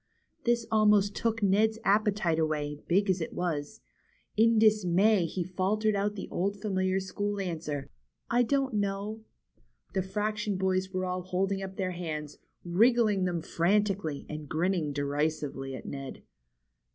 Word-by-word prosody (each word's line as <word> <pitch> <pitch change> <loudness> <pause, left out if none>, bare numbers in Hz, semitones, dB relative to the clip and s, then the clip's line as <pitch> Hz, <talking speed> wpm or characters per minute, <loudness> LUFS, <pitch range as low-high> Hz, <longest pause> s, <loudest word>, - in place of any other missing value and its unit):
'' - - -44
This 240 -1 +2
almost 210 -2 +4
took 230 -1 -1
Ned's 215 +3 +3
appetite 200 -5 +2
away, 150 -2 -1
big 195 +4 +3
as 185 -2 +1
it 160 - -4
was. 155 -5 -3 0.5
In 225 +1 +4
dismay 210 -3 +4
he 180 +2 -3
faltered 200 +4 0
out 205 +1 0
the 195 - -6
old 200 +3 -1
familiar 190 -2 0
school 205 +2 -3
answer: 155 -6 -3 0.4
^^I 240 0 +3
don't 270 -1 +1
know." 205 +1 -2 0.7
The 190 - +1
fraction 210 +1 -2
boys 190 0 0
were 185 0 -1
all 180 0 -2
holding 195 +2 -1
up 190 0 -6
their 185 -2 -2
hands, 155 -4 -5 0.3
wriggling 210 +1 +3
them 175 -3 -2
frantically, 190 -4 0
and 150 -1 -7
grinning 165 -2 0
derisively 140 -1 -2
at - - -9
Ned. 135 -1 -7
190 Hz, 145 wpm, -29 LUFS, 170-210 Hz, 0.7 s, almost